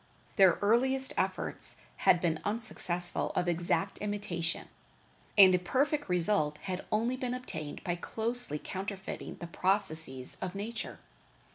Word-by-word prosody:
Their 190 Hz, -4 st, +6 dB
earliest 260 Hz, +5 st, +3 dB
efforts -, -, -2 dB, 0.2 s
had 175 Hz, -, +4 dB
been 165 Hz, -3 st, 0 dB
unsuccessful 185 Hz, -5 st, -2 dB
of 180 Hz, -, 0 dB
exact 175 Hz, +3 st, 0 dB
imitation, 200 Hz, -5 st, -3 dB, 0.7 s
and 190 Hz, -2 st, +9 dB
a 180 Hz, -, +3 dB
perfect 280 Hz, -, 0 dB
result 175 Hz, -4 st, +1 dB
had 185 Hz, -1 st, -4 dB
only 230 Hz, +4 st, +1 dB
been 250 Hz, -1 st, -2 dB
obtained 160 Hz, -12 st, -6 dB
by 175 Hz, -1 st, -2 dB
closely 230 Hz, -1 st, +4 dB
counterfeiting 190 Hz, +4 st, -6 dB
the -, -, -8 dB
processes 160 Hz, -8 st, -1 dB
of 185 Hz, 0 st, -4 dB
nature. 215 Hz, +3 st, -5 dB
190 Hz, 125 wpm, -31 LUFS, 175-225 Hz, 0.7 s, and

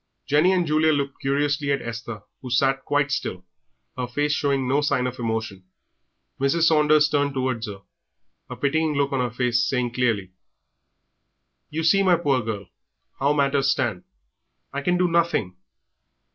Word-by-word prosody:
Jenny 150 Hz, +6 st, +3 dB
and 180 Hz, -2 st, +2 dB
Julia 155 Hz, 0 st, +3 dB
looked 140 Hz, -1 st, -3 dB
curiously 145 Hz, +1 st, 0 dB
at 140 Hz, -, +1 dB
Esther, 115 Hz, -2 st, -6 dB, 0.2 s
who 130 Hz, -, -7 dB
sat 135 Hz, +2 st, +1 dB
quite 145 Hz, 0 st, +1 dB
still, 90 Hz, -7 st, -3 dB, 0.5 s
her 125 Hz, -1 st, -3 dB
face 145 Hz, +5 st, -1 dB
showing 140 Hz, -3 st, 0 dB
no 140 Hz, +3 st, +2 dB
sign 135 Hz, -3 st, +1 dB
of 125 Hz, 0 st, -4 dB
emotion. 110 Hz, -4 st, -3 dB, 0.8 s
Mrs. 140 Hz, +5 st, +1 dB
Saunders 155 Hz, -1 st, +4 dB
turned 145 Hz, -2 st, 0 dB
towards 130 Hz, -3 st, -2 dB
her, 100 Hz, -2 st, -9 dB, 0.7 s
a -, -, -6 dB
pitying 155 Hz, +2 st, 0 dB
look 140 Hz, 0 st, +1 dB
on 135 Hz, -, 0 dB
her 125 Hz, -1 st, 0 dB
face, 120 Hz, 0 st, 0 dB
saying 120 Hz, 0 st, -1 dB
clearly, 115 Hz, -7 st, 0 dB, 1.4 s
"You 160 Hz, +2 st, -3 dB
see, 195 Hz, +5 st, +4 dB
my 185 Hz, -2 st, +4 dB
poor 140 Hz, -6 st, +1 dB
girl, 105 Hz, -3 st, -5 dB, 0.5 s
how 140 Hz, +2 st, +2 dB
matters 140 Hz, -1 st, +2 dB
stand; 120 Hz, -10 st, -1 dB, 0.7 s
I 140 Hz, -, -2 dB
can 180 Hz, +5 st, +1 dB
do 180 Hz, 0 st, +2 dB
nothing." 170 Hz, -, 0 dB
140 Hz, 160 wpm, -23 LUFS, 120-150 Hz, 1.4 s, Saunders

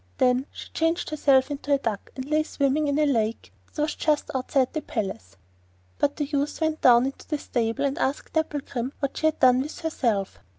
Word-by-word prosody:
Then 250 Hz, +2 st, +2 dB
she -, -, -10 dB
changed 325 Hz, +1 st, 0 dB
herself 280 Hz, -2 st, +3 dB
into 285 Hz, 0 st, -4 dB
a 280 Hz, -, +5 dB
duck, 225 Hz, -7 st, -4 dB
and 260 Hz, -, -5 dB
lay 305 Hz, +2 st, +2 dB
swimming 295 Hz, -1 st, 0 dB
in 285 Hz, 0 st, +1 dB
a 305 Hz, -, +3 dB
lake 230 Hz, -5 st, -1 dB, 0.2 s
that 300 Hz, -, 0 dB
was 300 Hz, 0 st, -1 dB
just 300 Hz, -1 st, 0 dB
outside 260 Hz, 0 st, 0 dB
the 310 Hz, -, -2 dB
palace. 115 Hz, -, -5 dB, 0.6 s
But 285 Hz, -, +1 dB
the 295 Hz, -, -1 dB
youth 285 Hz, 0 st, -2 dB
went 315 Hz, -1 st, 0 dB
down 245 Hz, 0 st, +6 dB
into 270 Hz, -, -6 dB
the 305 Hz, -, -1 dB
stable 240 Hz, 0 st, -1 dB
and 275 Hz, 0 st, -1 dB
asked 270 Hz, +2 st, -2 dB
Dapplegrim 280 Hz, -5 st, -2 dB
what 275 Hz, -2 st, -2 dB
she 315 Hz, -, +2 dB
had 310 Hz, -, -1 dB
done 255 Hz, 0 st, +5 dB
with 295 Hz, +3 st, -6 dB
herself. 230 Hz, -, -1 dB
275 Hz, 205 wpm, -25 LUFS, 250-300 Hz, 0.6 s, down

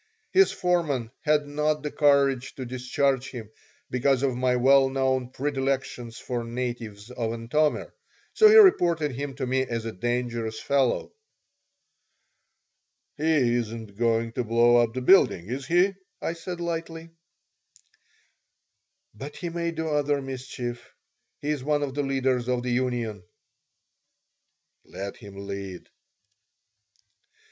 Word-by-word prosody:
His 385 Hz, +1 st, +5 dB
foreman 155 Hz, -10 st, 0 dB
had 150 Hz, -1 st, +2 dB
not 150 Hz, +1 st, -1 dB
the 150 Hz, -, -3 dB
courage 140 Hz, -3 st, +2 dB
to 130 Hz, -, -6 dB
discharge 130 Hz, +1 st, -1 dB
him, 115 Hz, -4 st, -9 dB, 0.4 s
because 130 Hz, +1 st, +2 dB
of 130 Hz, -3 st, +1 dB
my 125 Hz, 0 st, +1 dB
well 135 Hz, +2 st, +5 dB
known 130 Hz, -2 st, 0 dB
predilection 135 Hz, -3 st, -2 dB
for 120 Hz, +1 st, -5 dB
natives 115 Hz, -3 st, -5 dB
of 115 Hz, -3 st, -2 dB
Antomir, 135 Hz, +7 st, 0 dB, 0.4 s
so 435 Hz, -, +7 dB
he 430 Hz, -, +6 dB
reported 170 Hz, -, +5 dB
him 135 Hz, +2 st, -5 dB
to 135 Hz, -, -3 dB
me 130 Hz, +1 st, +1 dB
as 115 Hz, -3 st, -3 dB
a 115 Hz, -, -3 dB
dangerous 120 Hz, +1 st, -2 dB
fellow 135 Hz, -3 st, 0 dB, 2.0 s
"He 150 Hz, -6 st, +2 dB
isn't 115 Hz, -3 st, -4 dB
going 115 Hz, 0 st, +1 dB
to 125 Hz, +2 st, -2 dB
blow 120 Hz, +1 st, +4 dB
up 120 Hz, -1 st, +2 dB
the 130 Hz, -, -2 dB
building, 125 Hz, -, +5 dB
is 130 Hz, +2 st, -4 dB
he?" 180 Hz, +4 st, +3 dB, 0.3 s
I -, -, -2 dB
said, 170 Hz, +1 st, -7 dB
lightly 165 Hz, -1 st, -5 dB, 2.0 s
"But 135 Hz, +8 st, -9 dB
he 175 Hz, -, -5 dB
may 170 Hz, 0 st, -2 dB
do 160 Hz, -1 st, -3 dB
other 145 Hz, -1 st, +1 dB
mischief. 130 Hz, -2 st, -6 dB, 0.5 s
He's 145 Hz, -2 st, -3 dB
one 145 Hz, +1 st, +1 dB
of 135 Hz, -2 st, -3 dB
the 145 Hz, -, -1 dB
leaders 130 Hz, -3 st, 0 dB
of 125 Hz, -1 st, 0 dB
the 125 Hz, -, -2 dB
union." 120 Hz, -4 st, -1 dB, 1.6 s
"Let 100 Hz, +1 st, -7 dB
him 100 Hz, -1 st, -10 dB
lead." 100 Hz, -2 st, -7 dB
130 Hz, 130 wpm, -26 LUFS, 120-145 Hz, 2.0 s, so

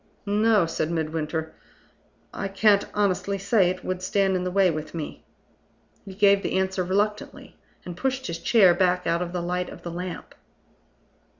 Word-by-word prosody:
"No," 210 Hz, -1 st, +3 dB
said 160 Hz, -1 st, -2 dB
Midwinter; 160 Hz, -1 st, -3 dB, 0.8 s
"I 195 Hz, -, -3 dB
can't 200 Hz, +1 st, +3 dB
honestly 200 Hz, -1 st, 0 dB
say 195 Hz, -1 st, +2 dB
it 185 Hz, 0 st, -5 dB
would 185 Hz, 0 st, -3 dB
stand 195 Hz, 0 st, +1 dB
in 180 Hz, -, -1 dB
the 180 Hz, -, -1 dB
way 190 Hz, -1 st, +3 dB
with 155 Hz, +1 st, -6 dB
me." 155 Hz, -3 st, -6 dB, 0.8 s
He 190 Hz, -2 st, -9 dB
gave 200 Hz, 0 st, +4 dB
the 190 Hz, -, -1 dB
answer 190 Hz, 0 st, 0 dB
reluctantly, 205 Hz, +3 st, -2 dB, 0.3 s
and 175 Hz, -, -7 dB
pushed 265 Hz, +5 st, -2 dB
his 170 Hz, 0 st, -4 dB
chair 200 Hz, -3 st, +5 dB
back 180 Hz, 0 st, +1 dB
out 170 Hz, +1 st, 0 dB
of 175 Hz, -1 st, -3 dB
the 175 Hz, -1 st, -3 dB
light 180 Hz, +1 st, -2 dB
of -, -, -12 dB
the 170 Hz, -, -5 dB
lamp. 180 Hz, +1 st, -6 dB
185 Hz, 170 wpm, -25 LUFS, 175-200 Hz, 0.8 s, chair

